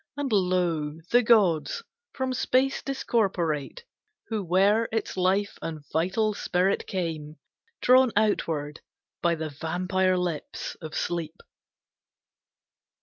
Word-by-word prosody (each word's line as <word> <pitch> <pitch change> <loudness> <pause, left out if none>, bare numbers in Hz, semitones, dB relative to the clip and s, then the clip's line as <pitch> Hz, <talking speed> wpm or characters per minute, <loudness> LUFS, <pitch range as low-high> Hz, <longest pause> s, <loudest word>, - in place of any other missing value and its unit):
And, 285 -3 -2
lo, 175 -6 +1
the 245 - +6
gods, 215 - +3 0.3
from 260 -1 -2
space 260 +1 +1
discorporate, 195 - -1 0.5
Who 220 -3 -2
were 195 +6 +3
its 225 0 -2
life 190 +2 +1
and 155 -3 -6
vital 195 +7 +1
spirit, 185 0 0
came, 160 -5 -3 0.5
Drawn 255 0 +6
outward 160 -8 0 0.4
by 170 -1 +2
the 160 -1 -4
vampire 185 +5 0
lips 175 -4 -3
of 155 -2 -7
Sleep! 165 -2 -2
185 Hz, 105 wpm, -26 LUFS, 160-220 Hz, 0.5 s, the